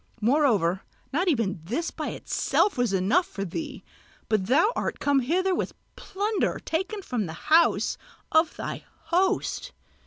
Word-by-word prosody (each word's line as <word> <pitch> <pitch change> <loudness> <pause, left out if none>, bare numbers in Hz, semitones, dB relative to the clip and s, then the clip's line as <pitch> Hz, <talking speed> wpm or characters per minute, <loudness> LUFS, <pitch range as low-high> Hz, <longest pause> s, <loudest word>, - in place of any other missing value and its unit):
Moreover 220 - +2 0.3
not 350 +7 +1
even 225 - +1
this 250 - -2
by - - -4
itself 415 - 0
was 245 -4 +1
enough 200 - +2
for 195 0 -5
thee, 265 - -6 0.5
but 210 -4 +1
thou 320 - +4
art - - -2
come 285 -1 +3
hither 365 +9 +1
with - - -2 0.2
plunder 410 +1 -1
taken 380 +5 -2
from 230 - -2
the 160 - -6 0.2
house 335 +1 +4 0.3
of 320 0 +3
thy - - -5 0.3
host. 380 +7 0
290 Hz, 145 wpm, -26 LUFS, -, 0.5 s, thou